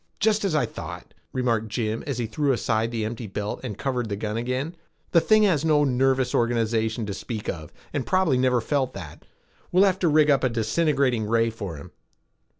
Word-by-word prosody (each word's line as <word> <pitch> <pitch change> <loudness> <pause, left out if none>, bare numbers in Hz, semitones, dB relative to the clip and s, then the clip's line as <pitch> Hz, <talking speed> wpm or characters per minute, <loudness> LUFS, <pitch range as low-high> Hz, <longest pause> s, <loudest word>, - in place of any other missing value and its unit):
"Just 215 0 +2
as 190 -6 0
I 145 -5 +3
thought," 115 - -8 0.2
remarked 115 -4 0
Jim 110 +1 -2
as 140 -4 -2
he 120 - -1
threw 135 +5 0
aside 115 -2 0
the 115 -2 -2
empty 115 +1 -5
belt 105 +1 -4
and 105 - -5
covered 125 -4 -2
the 100 - -1
gun 105 +1 -3
again. 130 +8 -2 0.4
"The 170 - +5
thing 215 +3 +4
has 170 -8 +3
no 150 -2 +4
nervous 130 -1 +2
organization 115 -1 +1
to 100 - -4
speak 110 +1 -6
of 80 -3 -5 0.2
and 145 - -1
probably 185 -8 +2
never 125 -2 +2
felt 130 +1 -1
that. 85 -6 -9 0.5
We'll 185 +2 +5
have 190 -2 +2
to 180 - +2
rig 155 -1 +5
up 140 - +2
a 130 - +3
disintegrating 125 0 +1
ray 115 +1 +2
for 100 -6 -6
him." 70 - -11
125 Hz, 200 wpm, -25 LUFS, 110-145 Hz, 0.5 s, The